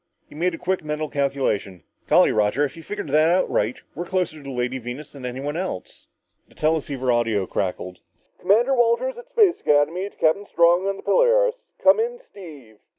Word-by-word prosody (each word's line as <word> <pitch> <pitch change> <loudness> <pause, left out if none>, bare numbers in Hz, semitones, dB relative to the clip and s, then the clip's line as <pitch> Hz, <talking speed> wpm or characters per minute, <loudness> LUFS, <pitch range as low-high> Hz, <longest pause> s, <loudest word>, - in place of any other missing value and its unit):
He - - -16
made 170 +3 -1
a - - -10
quick 185 0 -2
mental 150 0 -3
calculation. 130 - -2 0.2
"Golly, - - +5
Roger 105 +7 +1
if 145 - -7
you've 165 - -13
figured 185 -8 -5
it 160 +5 +3
right, 110 +4 -1
we're 175 +4 -5
closer 180 -4 -1
to - - -12
the 140 - -9
Lady 125 0 -2
Venus 125 +5 -8
than 135 -3 -7
anyone 135 +4 -4
else!" 180 - -6 0.4
The - - -24
teleceiver 145 -5 0
audio 115 -5 +1
crackled. 90 -1 -4 0.4
"Commander 235 +7 +3
Walters 245 - +1
at - - -13
Space 405 -6 +3
Academy 160 +7 +1
to - - -27
Captain 200 +6 +1
Strong 170 +3 +3
on 195 0 -2
the - - -12
Polaris. - - +3 0.3
Come 285 +8 +6
in, 485 +2 -2
Steve!" 145 - -13
155 Hz, 185 wpm, -23 LUFS, 130-195 Hz, 0.4 s, Come